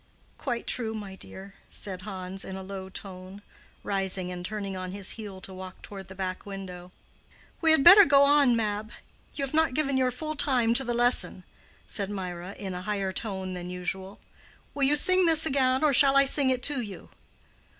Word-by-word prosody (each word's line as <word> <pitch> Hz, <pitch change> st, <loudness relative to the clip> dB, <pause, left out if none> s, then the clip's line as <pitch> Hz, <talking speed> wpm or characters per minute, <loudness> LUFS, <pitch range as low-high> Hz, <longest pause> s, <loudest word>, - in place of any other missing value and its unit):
"Quite 240 Hz, -4 st, -3 dB
true, 225 Hz, -3 st, -3 dB
my 205 Hz, -3 st, -7 dB
dear," 190 Hz, +1 st, -11 dB, 0.2 s
said 185 Hz, -3 st, -4 dB
Hans, 190 Hz, -1 st, -5 dB
in 190 Hz, -, -7 dB
a 190 Hz, -, -7 dB
low 190 Hz, 0 st, -8 dB
tone, 190 Hz, +1 st, -10 dB, 0.4 s
rising 190 Hz, -2 st, -2 dB
and 180 Hz, 0 st, -7 dB
turning 200 Hz, 0 st, -5 dB
on 185 Hz, 0 st, -6 dB
his 200 Hz, -1 st, -1 dB
heel 205 Hz, -4 st, -7 dB
to 190 Hz, -, -8 dB
walk 185 Hz, 0 st, -10 dB
toward 195 Hz, -2 st, -9 dB
the 190 Hz, -, -11 dB
back 185 Hz, -1 st, -4 dB
window. 185 Hz, -3 st, -9 dB, 0.7 s
"We 325 Hz, -, +3 dB
had 315 Hz, -3 st, +4 dB
better 390 Hz, +6 st, +10 dB
go 280 Hz, -4 st, +5 dB
on, 280 Hz, -3 st, +4 dB
Mab; 215 Hz, -1 st, -2 dB, 0.5 s
you 280 Hz, -, -2 dB
have 270 Hz, -, -10 dB
not 320 Hz, -4 st, +2 dB
given 275 Hz, -3 st, 0 dB
your 255 Hz, -1 st, +2 dB
full 310 Hz, +5 st, -5 dB
time 250 Hz, -6 st, +3 dB
to 265 Hz, +3 st, +4 dB
the 240 Hz, -2 st, -2 dB
lesson," 240 Hz, +1 st, +1 dB, 0.4 s
said 200 Hz, -2 st, -2 dB
Mirah, 185 Hz, -1 st, -6 dB
in 190 Hz, -2 st, -6 dB
a 180 Hz, -, -6 dB
higher 200 Hz, -1 st, -2 dB
tone 190 Hz, -2 st, -3 dB
than 180 Hz, 0 st, -7 dB
usual. 190 Hz, +2 st, -5 dB, 0.5 s
"Will 280 Hz, -1 st, +1 dB
you 290 Hz, +2 st, +3 dB
sing 370 Hz, +4 st, +5 dB
this 320 Hz, -1 st, +5 dB
again, 265 Hz, -2 st, +2 dB
or 300 Hz, -2 st, +3 dB
shall 275 Hz, +1 st, +6 dB
I 275 Hz, -, +7 dB
sing 275 Hz, 0 st, +3 dB
it 255 Hz, -1 st, -1 dB
to 285 Hz, -3 st, +1 dB
you?" 200 Hz, -6 st, -9 dB
205 Hz, 195 wpm, -27 LUFS, 190-270 Hz, 0.7 s, better